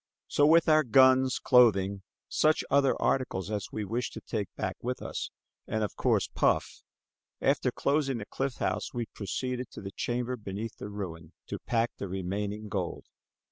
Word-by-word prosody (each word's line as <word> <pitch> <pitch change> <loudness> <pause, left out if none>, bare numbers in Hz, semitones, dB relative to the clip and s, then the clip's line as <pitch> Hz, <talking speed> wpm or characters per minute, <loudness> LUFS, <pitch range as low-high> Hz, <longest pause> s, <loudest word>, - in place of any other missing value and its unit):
So, 145 - +3
with 165 +1 +5
our 155 -1 +6
guns, 130 +1 +5
clothing, 100 -6 +4 0.3
such 155 0 +2
other 140 -1 +3
articles 105 -7 0
as 105 -3 -2
we 105 -1 -3
wished 115 +4 -2
to - - -6
take 100 - -3
back - - -2
with 125 +1 -3
us, - - -4 0.4
and 110 0 -1
of 105 - -3
course, - - +2
Puff, - - 0 0.6
after - - +2
closing 140 -2 +1
the 105 - -6
cliff 135 +2 -3
house - - -2
we 120 -1 -1
proceeded 125 +6 -4
to - - -10
the 95 -1 -6
chamber 125 +4 -2
beneath 105 +1 -6
the 105 - -6
ruin 85 -5 -7
to - - -5
pack 115 0 0
the 100 - -3
remaining 100 +3 -3
gold. 95 -4 -3
115 Hz, 170 wpm, -29 LUFS, 100-130 Hz, 0.6 s, our